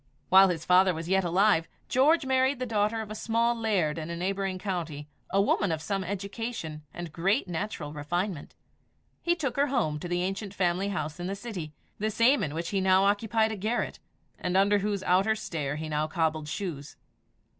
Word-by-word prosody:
While 190 Hz, +1 st, +8 dB
his 165 Hz, -3 st, -3 dB
father 185 Hz, 0 st, +5 dB
was 165 Hz, +1 st, -5 dB
yet 190 Hz, 0 st, +3 dB
alive, 175 Hz, -1 st, +3 dB, 0.2 s
George 285 Hz, +4 st, +3 dB
married 265 Hz, +1 st, +2 dB
the 255 Hz, -, -3 dB
daughter 220 Hz, -1 st, 0 dB
of 215 Hz, -1 st, -7 dB
a -, -, -3 dB
small 230 Hz, +2 st, +1 dB
laird 195 Hz, -9 st, 0 dB
in 155 Hz, +1 st, -5 dB
a 170 Hz, -, -3 dB
neighbouring 190 Hz, +1 st, -2 dB
county 170 Hz, -7 st, -4 dB, 0.2 s
a 195 Hz, -, +2 dB
woman 200 Hz, -1 st, +2 dB
of 160 Hz, -, -1 dB
some 190 Hz, +5 st, -2 dB
education, 200 Hz, -4 st, -5 dB
and 175 Hz, -1 st, -7 dB
great 195 Hz, +8 st, +1 dB
natural 170 Hz, -4 st, -4 dB
refinement. 170 Hz, +3 st, -3 dB, 0.7 s
He 345 Hz, 0 st, +2 dB
took 275 Hz, -7 st, -3 dB
her 285 Hz, +1 st, +3 dB
home 205 Hz, -, 0 dB
to 175 Hz, -, -5 dB
the 175 Hz, 0 st, 0 dB
ancient 195 Hz, +1 st, -4 dB
family 185 Hz, +1 st, +1 dB
house 165 Hz, -5 st, -3 dB
in 175 Hz, -, -3 dB
the 195 Hz, -, -2 dB
city 195 Hz, -8 st, -6 dB, 0.3 s
the 215 Hz, +1 st, 0 dB
same 230 Hz, +6 st, +4 dB
in 150 Hz, 0 st, -3 dB
which 165 Hz, +1 st, -3 dB
he 195 Hz, -2 st, 0 dB
now 190 Hz, 0 st, +4 dB
occupied 220 Hz, +2 st, +2 dB
a -, -, -3 dB
garret, 215 Hz, +5 st, -2 dB, 0.4 s
and 180 Hz, +1 st, 0 dB
under 200 Hz, +1 st, +4 dB
whose 200 Hz, -1 st, -2 dB
outer 195 Hz, +5 st, +3 dB
stair 155 Hz, -9 st, -3 dB
he 155 Hz, +1 st, -4 dB
now 155 Hz, 0 st, 0 dB
cobbled 155 Hz, -1 st, -1 dB
shoes. 150 Hz, -6 st, -5 dB
190 Hz, 195 wpm, -28 LUFS, 165-215 Hz, 0.7 s, While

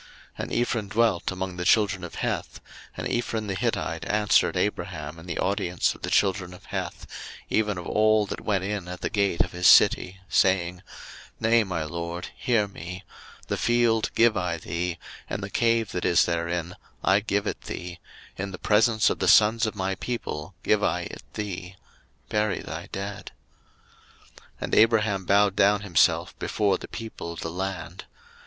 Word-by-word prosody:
01:023:010 -, -, -20 dB, 0.3 s
And -, -, -4 dB
Ephron 120 Hz, -3 st, -1 dB
dwelt 110 Hz, -4 st, +1 dB
among 95 Hz, -1 st, -4 dB
the 90 Hz, -, -2 dB
children 100 Hz, 0 st, +3 dB
of 90 Hz, -, -7 dB
Heth: -, -, -3 dB, 0.4 s
and -, -, -3 dB
Ephron 115 Hz, -2 st, -2 dB
the 100 Hz, -, -2 dB
Hittite 85 Hz, -3 st, -2 dB
answered 105 Hz, -2 st, +3 dB
Abraham 85 Hz, -5 st, -3 dB
in 80 Hz, -, -12 dB
the 85 Hz, -, -4 dB
audience 90 Hz, -2 st, 0 dB
of -, -, -16 dB
the -, -, -3 dB
children 95 Hz, -2 st, +1 dB
of -, -, -16 dB
Heth, -, -, -5 dB, 0.5 s
even 105 Hz, -3 st, +1 dB
of 90 Hz, -, -6 dB
all 110 Hz, 0 st, +3 dB
that -, -, -6 dB
went 100 Hz, -3 st, 0 dB
in 100 Hz, -2 st, -3 dB
at 90 Hz, 0 st, -7 dB
the -, -, -2 dB
gate 100 Hz, -5 st, +1 dB
of 90 Hz, -, +1 dB
his 90 Hz, +1 st, +2 dB
city, 90 Hz, +1 st, +6 dB
saying, 90 Hz, -1 st, +2 dB, 0.6 s
01:023:011 115 Hz, -, 0 dB
Nay, 115 Hz, -1 st, +6 dB
my 90 Hz, -5 st, -3 dB
lord, 85 Hz, +2 st, -5 dB
hear 115 Hz, -4 st, +1 dB
me: 90 Hz, 0 st, -8 dB, 0.4 s
the -, -, -1 dB
field 120 Hz, -2 st, +2 dB
give 115 Hz, -1 st, +5 dB
I 90 Hz, -3 st, -1 dB
thee, 85 Hz, +1 st, -3 dB, 0.3 s
and 100 Hz, -, -3 dB
the 100 Hz, -, -6 dB
cave 115 Hz, -2 st, +2 dB
that 90 Hz, -, -3 dB
is 85 Hz, -, +4 dB
therein, 85 Hz, 0 st, -2 dB, 0.3 s
I 95 Hz, +2 st, +4 dB
give 100 Hz, -1 st, -1 dB
it -, -, -3 dB
thee; 90 Hz, -1 st, -6 dB, 0.4 s
in 100 Hz, +1 st, -3 dB
the 95 Hz, -, -7 dB
presence 110 Hz, +1 st, +3 dB
of -, -, -3 dB
the -, -, 0 dB
sons 110 Hz, +2 st, +5 dB
of 110 Hz, -, -4 dB
my 95 Hz, -1 st, -1 dB
people 95 Hz, -6 st, -5 dB
give 105 Hz, -1 st, +2 dB
I 90 Hz, +2 st, +1 dB
it 85 Hz, -, -8 dB
thee: 95 Hz, -3 st, -5 dB, 0.5 s
bury 105 Hz, +3 st, 0 dB
thy -, -, -7 dB
dead. 100 Hz, +1 st, -6 dB, 1.0 s
01:023:012 -, -, -17 dB, 0.2 s
And -, -, -4 dB
Abraham 110 Hz, -4 st, +3 dB
bowed 100 Hz, +1 st, +4 dB
down 100 Hz, +1 st, +4 dB
himself 100 Hz, -5 st, +2 dB
before 100 Hz, -2 st, +1 dB
the -, -, -8 dB
people 110 Hz, -7 st, -7 dB
of 85 Hz, -, -8 dB
the 80 Hz, -, -4 dB
land. 90 Hz, 0 st, -5 dB
95 Hz, 180 wpm, -26 LUFS, 90-105 Hz, 1.0 s, city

